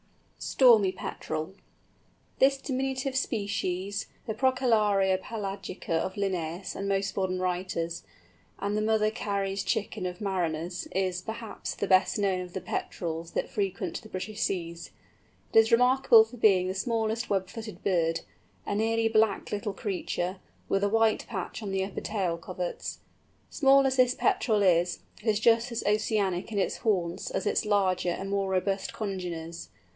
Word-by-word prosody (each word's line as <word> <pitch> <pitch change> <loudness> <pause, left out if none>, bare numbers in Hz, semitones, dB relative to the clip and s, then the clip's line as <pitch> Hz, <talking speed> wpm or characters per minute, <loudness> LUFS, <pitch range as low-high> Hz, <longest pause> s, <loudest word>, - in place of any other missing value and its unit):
STORMY 220 -8 +5
PETREL. 155 -1 -5 0.9
This 275 +1 +5
diminutive 265 0 -2
species, 200 -4 -1 0.2
the 220 - -2
Procellaria 215 -7 +3
pelagica 195 -5 -5
of 185 +4 0
Linnæus 185 -3 -2
and 200 0 -3
most 195 0 0
modern 185 -1 -1
writers, 180 -2 -2 0.6
and 200 +1 -2
the 215 - +1
"Mother 215 0 +2
Carey's 200 -3 -2
Chicken" 200 -2 -1
of 180 +1 -6
mariners, 175 -3 -2
is, 185 -1 -1
perhaps, 220 +3 -6
the - - -1
best 185 -1 +4
known 195 -3 +1
of 180 -1 -8
the 190 - -4
Petrels 165 -2 -4
that - - -1
frequent 195 -2 -2
the 220 - -13
British 210 +3 -5
seas. 170 -2 -2 0.6
It - - +8
is 225 0 +4
remarkable 250 -1 +6
for 230 +3 -11
being 195 -5 +4
the 185 - -1
smallest 225 +3 -1
web 190 -2 +1
footed 220 +1 -8
bird—a 165 +2 -2
nearly 225 +1 +2
black 220 -2 +2
little 205 0 -2
creature, 185 -3 -3 0.3
with 195 0 +1
a 205 - +3
white 225 0 +2
patch 195 +1 -5
on 205 - -4
the 195 0 0
upper 195 - -6
tail 190 -6 -1
coverts. 180 +1 -5 0.5
Small 275 -1 +5
as 265 0 +1
this 250 -1 +4
Petrel 235 - +2
is, 175 -1 +2 0.2
it - - -10
is 210 -1 +3
just 230 +2 +3
as 235 - -2
oceanic 205 -2 0
in 210 - -3
its 195 - 0
haunts 180 -6 -1
as 190 - -2
its - - +1
larger 195 -4 +2
and 195 +3 -3
more 195 -1 0
robust 190 +1 0
congeners. 175 -5 -5
200 Hz, 155 wpm, -28 LUFS, 185-220 Hz, 0.9 s, It